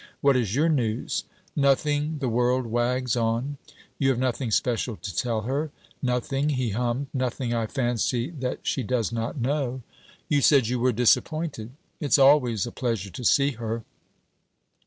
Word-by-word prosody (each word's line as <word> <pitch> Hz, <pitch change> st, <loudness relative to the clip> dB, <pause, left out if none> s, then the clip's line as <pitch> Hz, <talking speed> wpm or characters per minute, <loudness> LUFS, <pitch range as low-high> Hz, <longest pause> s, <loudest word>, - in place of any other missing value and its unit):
What 140 Hz, -1 st, +4 dB
is 115 Hz, -4 st, 0 dB
your 155 Hz, +4 st, +3 dB
news?' 120 Hz, -8 st, 0 dB, 0.3 s
'Nothing; 145 Hz, +2 st, +2 dB
the 140 Hz, -3 st, -2 dB
world 125 Hz, +2 st, +1 dB
wags 120 Hz, +2 st, 0 dB
on.' 120 Hz, +4 st, -1 dB, 0.4 s
'You 135 Hz, -, +3 dB
have 130 Hz, -, +2 dB
nothing 130 Hz, 0 st, -1 dB
special 120 Hz, +1 st, 0 dB
to 100 Hz, -4 st, -7 dB
tell 115 Hz, +1 st, 0 dB
her?' 140 Hz, +7 st, -2 dB, 0.3 s
'Nothing'; 135 Hz, +3 st, 0 dB
he 130 Hz, -6 st, 0 dB
hummed; 120 Hz, +5 st, -1 dB
'nothing, 130 Hz, -2 st, -1 dB
I 115 Hz, -1 st, 0 dB
fancy, 120 Hz, +2 st, -1 dB
that 130 Hz, -6 st, -4 dB
she 135 Hz, -, -1 dB
does 115 Hz, -1 st, -1 dB
not 115 Hz, +4 st, -3 dB
know.' 130 Hz, -1 st, -1 dB, 0.4 s
'You 145 Hz, -2 st, +2 dB
said 135 Hz, -4 st, +5 dB
you 125 Hz, 0 st, 0 dB
were 125 Hz, +1 st, +3 dB
disappointed.' 125 Hz, +1 st, +1 dB, 0.3 s
'It's 145 Hz, -1 st, +3 dB
always 135 Hz, -7 st, +4 dB
a 120 Hz, -, -6 dB
pleasure 115 Hz, -6 st, -2 dB
to 125 Hz, -, -7 dB
see 140 Hz, +4 st, +4 dB
her.' 115 Hz, -2 st, -4 dB
125 Hz, 155 wpm, -26 LUFS, 115-140 Hz, 0.4 s, said